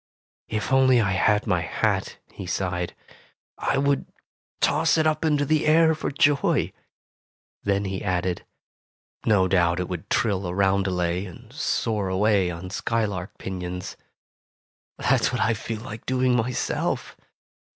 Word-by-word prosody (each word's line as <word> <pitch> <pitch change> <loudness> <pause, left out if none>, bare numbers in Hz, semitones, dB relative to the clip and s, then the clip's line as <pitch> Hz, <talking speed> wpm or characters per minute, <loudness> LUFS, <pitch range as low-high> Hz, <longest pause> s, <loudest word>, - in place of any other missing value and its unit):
"If 110 +4 -2
only 130 -2 +5
I 100 -4 +1
had 105 +2 +2
my 90 -6 +1
hat," - - -1
he 95 - -8
sighed, 90 -1 -2 0.6
"I - - 0
would 140 0 +1 0.5
toss - - +3
it 160 - +2
up 155 0 +1
into 150 -2 +2
the 155 +1 +1
air 160 +1 +5
for 155 - -3
joy." 145 0 +2 0.9
Then 100 0 0
he 95 0 -3
added, 90 -2 -1 0.8
"No 100 -4 +4
doubt 85 -2 +2
it 90 - -2
would 90 -3 -6
trill 100 -4 +1
a 90 - -4
roundelay 95 -2 +1
and 90 - -12
soar 105 -4 -1
away 95 -1 +2
on 90 +2 -6
skylark 100 -1 -2
pinions. 90 -1 -5 1.0
That's - - +2
what - - -2
I 115 - +3
feel 110 +1 -5
like 110 -1 -9
doing 130 -1 +2
myself. 125 +1 -1
100 Hz, 140 wpm, -25 LUFS, 90-125 Hz, 1.0 s, only